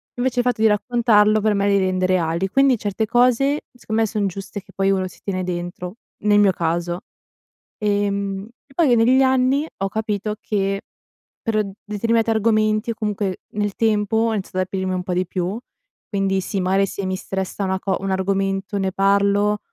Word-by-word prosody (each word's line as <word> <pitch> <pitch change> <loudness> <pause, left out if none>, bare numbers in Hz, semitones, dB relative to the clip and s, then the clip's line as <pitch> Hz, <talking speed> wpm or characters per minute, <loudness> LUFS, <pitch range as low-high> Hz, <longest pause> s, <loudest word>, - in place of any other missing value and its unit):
Invece 250 0 0
il 245 - +1
fatto 245 -3 0
di 225 - +6
raccontarlo 215 -1 +3
per 215 0 +2
me 200 0 +1
li 200 - +4
rende 185 -1 +1
reali, 185 0 +1
quindi 270 +1 +4
certe 205 +1 -2
cose 250 +4 +3
secondo 225 -2 -2
me 220 - +1
son 210 -1 -1
giuste 195 +2 -6
che - - -19
poi 195 0 +1
uno 190 -1 0
si - - -15
tiene 185 -2 -2
dentro, 175 +1 -5 0.3
nel 205 0 +4
mio 205 -2 +5
caso. 175 0 -2 0.8
Ehm, 200 -1 -1 0.3
poi 290 -7 +4
negli 250 +4 +4
anni 265 +3 +2
ho 195 - -1
capito 210 0 -2
che 195 -1 -1 0.6
pr 215 -1 +1 0.2
determinati 225 +2 0
argomenti, 215 0 +2
o - - -2
comunque 205 -3 -2
nel 205 -1 -2
tempo, 215 -1 +1
ho 225 0 +2
iniziato 190 -2 -4
ad - - +3
aprirmi 190 0 -2
un 180 0 -2
po' 180 - -3
di 180 +1 0
più, 185 +3 -2 0.5
quindi 195 -2 0
sì, 195 +1 -3
magari 190 +2 +2
se 195 0 -5
mi 185 0 -1
stressa 190 +1 -4
una 190 -1 -1
co 190 0 -1
un 195 0 -2
argomento 195 +1 -1
ne 190 -1 0
parlo. 200 +2 +2
200 Hz, 185 wpm, -21 LUFS, 190-220 Hz, 0.8 s, di